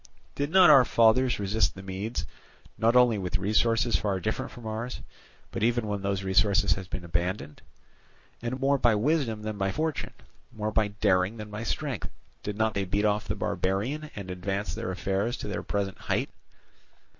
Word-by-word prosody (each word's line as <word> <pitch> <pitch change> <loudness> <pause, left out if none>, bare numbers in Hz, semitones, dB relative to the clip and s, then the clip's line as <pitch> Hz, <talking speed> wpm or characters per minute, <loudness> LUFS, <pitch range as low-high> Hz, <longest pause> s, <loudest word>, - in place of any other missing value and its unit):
Did 145 0 -2
not 180 -2 +7
our 135 -3 +8
fathers 120 +2 +4
resist 100 0 +1
the 95 - -9
Medes 95 -1 -4 0.5
not 115 +2 +2
only 125 -4 +5
with 95 +1 -1
resources 115 +4 +2
far 100 -3 -1
different 110 +3 -3
from 120 - -11
ours, 110 +3 -4 0.5
but - - -4
even 120 +1 +2
when 105 -1 -2
those 100 0 -1
resources 95 0 +3
had 95 -2 -8
been 95 0 -5
abandoned; 85 -1 -3 0.8
and 120 +2 -3
more 140 +1 +2
by 120 -3 +4
wisdom 115 -2 0
than 110 -1 -4
by 95 0 +1
fortune, 155 +5 -2 0.4
more 110 0 -3
by 110 -1 +2
daring 100 0 +1
than 105 -1 -8
by 105 +1 -5
strength, 115 - -3 0.3
did 105 0 -5
not 110 -1 +1
they 100 -1 -1
beat 100 +3 0
off 105 0 +1
the - - -1
barbarian 125 +12 -2
and 95 -2 -6
advance 95 0 -3
their 90 - -4
affairs 100 +5 -1
to - - -6
their 105 - -3
present 100 -2 -3
height? - - -1
105 Hz, 180 wpm, -28 LUFS, 95-115 Hz, 0.8 s, our